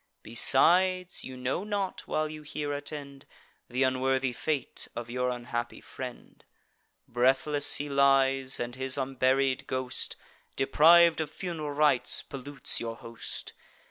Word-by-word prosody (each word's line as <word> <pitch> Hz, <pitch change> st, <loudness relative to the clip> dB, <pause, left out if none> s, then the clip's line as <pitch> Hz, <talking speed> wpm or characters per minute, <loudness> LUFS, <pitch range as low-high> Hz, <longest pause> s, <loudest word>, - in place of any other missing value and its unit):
Besides, 180 Hz, +10 st, +4 dB
you 130 Hz, 0 st, -8 dB
know 130 Hz, +8 st, -2 dB
not, 205 Hz, -2 st, -3 dB
while 155 Hz, 0 st, 0 dB
you 155 Hz, 0 st, -8 dB
here 150 Hz, -1 st, -4 dB
attend, 145 Hz, -1 st, -7 dB, 0.4 s
Th' 130 Hz, +2 st, +1 dB
unworthy 130 Hz, 0 st, +1 dB
fate 140 Hz, +1 st, -3 dB
of 120 Hz, 0 st, -6 dB
your 125 Hz, +1 st, -1 dB
unhappy 120 Hz, -1 st, -4 dB
friend: 125 Hz, -2 st, -10 dB, 0.6 s
Breathless 135 Hz, +4 st, +3 dB
he 145 Hz, -, -2 dB
lies; 135 Hz, -1 st, +2 dB
and 120 Hz, 0 st, -4 dB
his 130 Hz, +1 st, -2 dB
unburied 135 Hz, 0 st, 0 dB
ghost, 130 Hz, -1 st, -3 dB, 0.4 s
Depriv'd 160 Hz, +4 st, +5 dB
of 155 Hz, -, -4 dB
fun'ral 160 Hz, -3 st, -5 dB
rites, 145 Hz, -4 st, +2 dB
pollutes 140 Hz, 0 st, -3 dB
your 115 Hz, -1 st, -4 dB
host. 115 Hz, 0 st, -8 dB
135 Hz, 125 wpm, -28 LUFS, 130-150 Hz, 0.6 s, Depriv'd